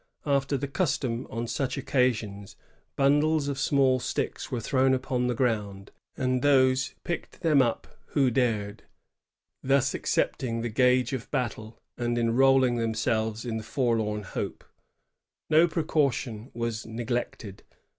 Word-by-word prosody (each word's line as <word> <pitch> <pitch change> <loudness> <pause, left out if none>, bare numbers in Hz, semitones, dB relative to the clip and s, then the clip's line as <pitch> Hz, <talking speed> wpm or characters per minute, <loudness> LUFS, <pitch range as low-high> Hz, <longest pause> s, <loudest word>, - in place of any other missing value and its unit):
After 140 -1 +1
the 140 +2 -3
custom 135 -6 -1
on 115 +1 -3
such 130 +3 -2
occasions^ 110 -7 -1 0.4
bundles 145 +2 +3
of 140 -1 -3
small 135 -2 +3
sticks - - -3
were 125 - -1
thrown 130 +3 +2
upon 125 -1 -1
the 125 - 0
ground, 105 -6 -2 0.3
and 130 -1 0
those 130 -2 +3
picked 170 - -5
them 155 -5 +4
up 120 -3 0 0.3
who 135 -4 +3
dared, 110 -4 0 0.8
thus 135 0 +2
accepting 115 -2 -1
the 120 - -2
gage 125 +3 +2
of 130 -1 -5
battle, 115 -4 -3 0.2
and 120 0 -1
enrolling 125 +1 +3
themselves 110 0 -1
in 115 -2 -2
the 110 - -5
forlorn 110 -3 -1
hope. - - -5 0.9
No 160 +3 +6
precaution 140 -8 -1
was 115 -1 -3
neglected. 115 -3 -4
125 Hz, 130 wpm, -27 LUFS, 115-135 Hz, 0.9 s, No